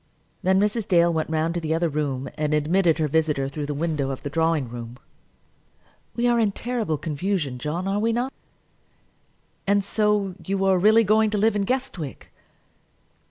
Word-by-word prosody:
Then 190 +1 +3
Mrs. 210 +1 0
Dale 170 -2 +4
went 160 -1 -1
round 160 +1 0
to 175 - -2
the 160 -1 -1
other 170 +1 +1
room, 140 -3 -2
and 150 0 0
admitted 165 +2 +2
her 155 -2 +1
visitor 150 -2 +1
through 145 +1 -5
the 145 - -3
window 150 -3 -1
of 135 - -5
the 145 - -4
drawing 160 -3 +1
room. 120 0 -8 1.2
"We 240 - 0
are 240 -1 +3
in 210 -3 +2
terrible 225 -11 -2
confusion, 155 -3 -2
John, 165 +8 -3
are 200 +1 0
we 225 +2 +1
not?" 245 +4 -1 1.3
"And 200 0 +3
so 210 -1 +1
you 195 0 -1
are 190 -1 +4
really 215 +4 +5
going 215 +1 +3
to 210 - -1
live 215 +1 +2
in 200 -1 0
Guestwick?" 225 - -4
170 Hz, 175 wpm, -24 LUFS, 150-205 Hz, 1.3 s, really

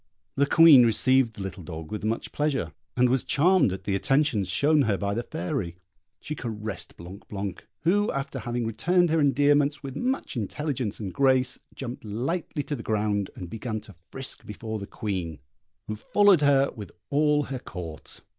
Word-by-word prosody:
The 140 +1 +2
Queen 155 -5 +8
received 120 +1 +4
the 100 - -6
little 95 0 -6
dog 80 -2 -8
with 105 - -4
much 110 +2 -2
pleasure, 150 -2 -1 0.2
and 125 0 +5
was 130 +1 +1
charmed 170 - +3
at 95 - -6
the 100 - -1
attentions 120 -1 +1
shown 145 +11 +3
her 110 -7 +1
by 100 0 -2
the 115 - -1
Fairy. 85 -5 -4 0.4
She 150 - -5
caressed 110 - -6
Blanc 90 +4 -11
blanc, 100 -2 -5
who, 200 +7 +2
after 140 +1 -4
having 120 -1 -3
returned 175 +9 +2
her 165 - +3
endearments 145 +1 +3
with 135 -1 -6
much 260 - -2
intelligence 125 0 -3
and 95 -4 -5
grace, 130 -2 +2 0.2
jumped 125 -2 -6
lightly 135 - -3
to 145 - -3
the 120 - -7
ground, 105 -3 0
and 90 - -7
began 110 +3 -4
to 105 -3 -15 0.2
frisk 135 0 -5
before 110 +1 -6
the 100 - -7
Queen, 90 -7 -4 0.5
who 110 - -3
followed 200 - +4
her 140 -1 +4
with 105 -6 -8 0.2
all 150 0 +3
her 135 -2 -5
Court. 85 -9 -8
120 Hz, 175 wpm, -26 LUFS, 105-145 Hz, 0.5 s, Queen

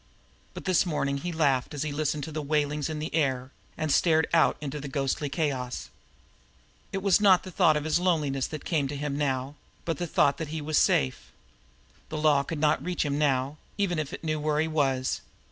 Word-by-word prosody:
But - - -8
this 185 -3 +3
morning 145 -5 -1
he 175 +5 -4
laughed 145 -3 +1
as 145 - -2
he 155 - -3
listened 150 0 -1
to 160 - -6
the 155 0 -3
wailings 150 0 0
in 155 - -3
the 155 +1 -5
air 130 -4 0 0.3
and 155 -1 -1
stared 160 +1 +3
out 165 - +4
into 150 0 -5
the 140 - -6
ghostly 140 +1 -1
chaos. 135 -4 -2 1.0
It 195 -1 -3
was 200 0 +4
not 190 -3 +6
the 185 - -8
thought 155 -2 +4
of 150 - -2
his 155 +2 +1
loneliness 150 -7 +1
that 155 -2 -7
come 150 -5 +1
to 145 - -5
him 145 0 -3
now, 135 -1 -1 0.3
but 165 -3 -2
the 175 - -2
thought 140 -2 +2
that 160 - -3
he 160 +2 -4
was 155 +1 +1
safe. 65 -2 +1 0.8
The 155 - -4
Law 150 -2 +4
could 160 +3 -5
not 150 0 +2
reach 180 -2 -1
him 145 0 -1
now, 140 0 +1 0.2
even 185 -5 0
if 150 -3 -3
it - - -8
knew 155 -1 -1
where 150 0 0
he 160 - +2
was. 135 -5 0
150 Hz, 215 wpm, -27 LUFS, 140-160 Hz, 1.0 s, not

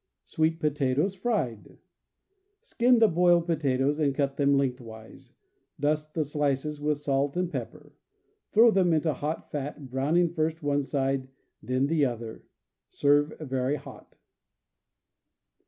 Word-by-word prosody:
Sweet 160 +1 0
Potatoes, 150 +3 0
Fried. 190 - -3 0.4
— 400 +1 -49
Skin 245 +1 +4
the 225 -1 +6
boiled 175 -1 +3
potatoes 145 -3 0
and 140 -3 +1
cut 140 -1 -1
them 140 -1 +3
lengthwise. 120 -5 -5 0.5
Dust 150 +1 -1
the 160 - +1
slices 145 0 -2
with 150 0 0
salt 140 +1 -1
and 180 -1 -1
pepper. - - -7 0.6
Throw 230 +2 +6
them 185 -4 +3
into 155 0 +1
hot 150 +4 -5
fat, 145 -2 -6
browning 160 +6 +1
first 160 0 -2
one 145 0 +1
side, 135 -1 -1 0.3
then 130 +4 0
the 150 0 +2
other. 115 -3 -5 0.5
Serve 145 +1 +2
very 135 -2 -1
hot. 150 - -12
145 Hz, 130 wpm, -27 LUFS, 135-165 Hz, 0.6 s, the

